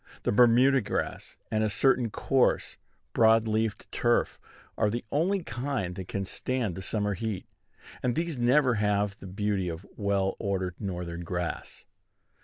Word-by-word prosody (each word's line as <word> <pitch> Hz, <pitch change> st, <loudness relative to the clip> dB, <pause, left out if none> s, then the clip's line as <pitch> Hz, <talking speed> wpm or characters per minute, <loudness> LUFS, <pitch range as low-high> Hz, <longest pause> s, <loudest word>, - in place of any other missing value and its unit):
The -, -, +1 dB
Bermuda 125 Hz, +4 st, +5 dB
grass, 100 Hz, -, -4 dB
and 110 Hz, 0 st, +1 dB
a 110 Hz, -, +1 dB
certain 125 Hz, +2 st, +2 dB
coarse, 130 Hz, +4 st, +1 dB, 0.4 s
broad 115 Hz, 0 st, +5 dB
leafed 110 Hz, -1 st, -1 dB
turf, -, -, +1 dB, 0.4 s
are 105 Hz, -, +2 dB
the 120 Hz, +3 st, -3 dB
only 180 Hz, +6 st, +1 dB
kind 120 Hz, -, -3 dB
that 90 Hz, 0 st, -7 dB
can 100 Hz, 0 st, -3 dB
stand 120 Hz, 0 st, -2 dB
the 95 Hz, -, -6 dB
summer 105 Hz, +1 st, -1 dB
heat; 105 Hz, 0 st, -4 dB, 0.6 s
and 125 Hz, -2 st, 0 dB
these 165 Hz, -1 st, -1 dB
never 125 Hz, +2 st, +3 dB
have 105 Hz, -1 st, +1 dB
the 95 Hz, -, -9 dB
beauty 100 Hz, -1 st, -1 dB
of 85 Hz, +3 st, -7 dB
well 100 Hz, -2 st, 0 dB
ordered 95 Hz, -3 st, -1 dB
Northern 90 Hz, -4 st, -4 dB
grass. 90 Hz, 0 st, -4 dB
105 Hz, 150 wpm, -28 LUFS, 95-125 Hz, 0.6 s, Bermuda